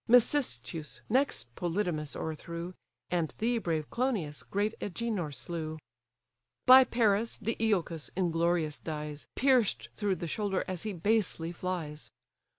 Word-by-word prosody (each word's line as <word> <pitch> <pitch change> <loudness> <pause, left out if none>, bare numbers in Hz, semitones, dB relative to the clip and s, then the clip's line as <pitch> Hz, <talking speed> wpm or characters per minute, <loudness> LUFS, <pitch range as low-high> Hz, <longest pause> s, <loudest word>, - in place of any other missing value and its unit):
Mecystes 165 - +2
next 215 - +1
Polydamas 170 -3 -1
o'erthrew; 170 +3 -5 0.4
And 170 -3 0
thee, 235 +1 +1
brave 160 -6 -2
Clonius, 215 - -1
great 205 +2 -1
Agenor 205 -5 -2
slew. 155 +4 -4 0.9
By 260 +1 +10
Paris, 230 -2 +2
Deiochus 210 -7 0
inglorious 170 -3 +1
dies, 150 -2 -5
Pierced 255 -5 +3
through 205 -3 +1
the 175 0 -5
shoulder 195 +3 -1
as 185 -3 -3
he 215 -2 -3
basely 180 -3 +1
flies. 170 -4 -4
180 Hz, 115 wpm, -31 LUFS, 160-220 Hz, 0.9 s, By